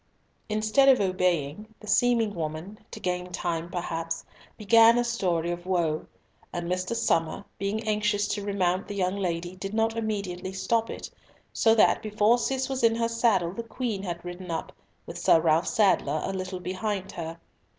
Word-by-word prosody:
Instead 215 +6 +3
of 260 - +6
obeying, 180 -2 0
the - - -13
seeming 230 -1 +2
woman, 165 +4 -5
to - - -8
gain 180 0 -3
time 170 -1 -2
perhaps, 165 -2 -3 0.3
began 230 +2 +6
a 240 - +3
story 180 -8 0
of 175 +1 -6
woe; 170 -4 0 0.4
and 175 0 -4
Mr. 185 +5 -1
Somer, 165 -5 0
being 210 +3 -2
anxious 210 -1 +1
to 205 - -2
remount 190 -1 0
the 205 - -5
young 185 -1 0
lady, 175 -1 -2
did 195 +3 -5
not 225 0 +1
immediately 200 -4 -3
stop 225 +4 0
it, - - -7 0.4
so 225 -1 +4
that 220 - +4
before 215 +2 +3
Cis 265 +1 -1
was 265 -3 -3
in 225 -1 +5
her 230 0 +1
saddle 230 -7 +2
the 235 - -5
Queen 230 -3 -3
had 175 -3 -5
ridden 175 +1 -7
up, 165 -1 -3 0.3
with - - -7
Sir 165 - +5
Ralf 160 +1 +2
Sadler 190 -8 +2
a 195 - -3
little 185 -1 -4
behind 190 +2 -3
her. 165 -2 -6
195 Hz, 170 wpm, -27 LUFS, 175-220 Hz, 0.4 s, of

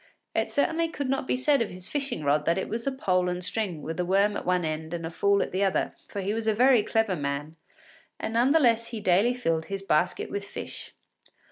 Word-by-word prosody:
It - - 0
certainly 325 +3 +1
could 285 -4 -4
not 270 -1 -1
be - - +1
said 275 0 +3
of 230 - 0
his 180 0 -10
fishing 275 - -3
rod 145 +1 +2
that 170 +2 +2
it 190 - -2
was 230 +3 -4
a - - +2
pole 185 -8 +1
and 180 0 -3
string 180 -4 -3
with 165 +2 -5
a - - +2
worm 195 +3 +2
at - - -5
one 180 -2 +2
end 160 +1 -3
and 165 -1 -5
a 165 - -5
fool 200 +3 +2
at - - -6
the 190 +2 0
other, 190 -1 +1
for 200 - -5
he 195 +2 -1
was 225 0 -3
a 220 - +3
very 250 0 +5
clever 220 -2 +1
man, 145 +1 -3 0.6
and 220 - -3
none 240 +4 +3
the 325 - +5
less 230 -4 +3
he 230 -2 -5
daily 205 +5 +3
filled 165 -9 -1
his 195 -1 -5
basket 175 -1 0
with 200 - -3
fish. 200 - -8
200 Hz, 245 wpm, -27 LUFS, 175-235 Hz, 0.6 s, very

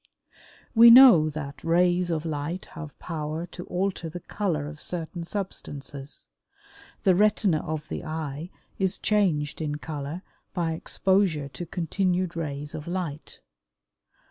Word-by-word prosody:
We 235 0 +9
know 235 -11 +9
that 140 -3 -7
rays 175 +1 +3
of 160 -1 -1
light 160 +3 -3
have 155 -3 -8
power 155 0 -4
to 175 0 -9
alter 180 -2 -2
the 175 +3 -7
color 175 -7 -2
of 150 0 -9
certain 170 0 -4
substances. 145 - -6 0.8
The 190 - +5
retina 200 -3 +3
of 155 0 -4
the - - -5
eye 155 0 -5 0.3
is 190 0 0
changed 165 -9 +1
in 150 -2 -2
color 150 +3 -5 0.3
by 170 -3 0
exposure 165 -3 +1
to 175 +4 -7
continued 180 +1 -1
rays 145 -3 -4
of 150 - -7
light. 170 -5 -5
165 Hz, 130 wpm, -26 LUFS, 150-185 Hz, 0.8 s, We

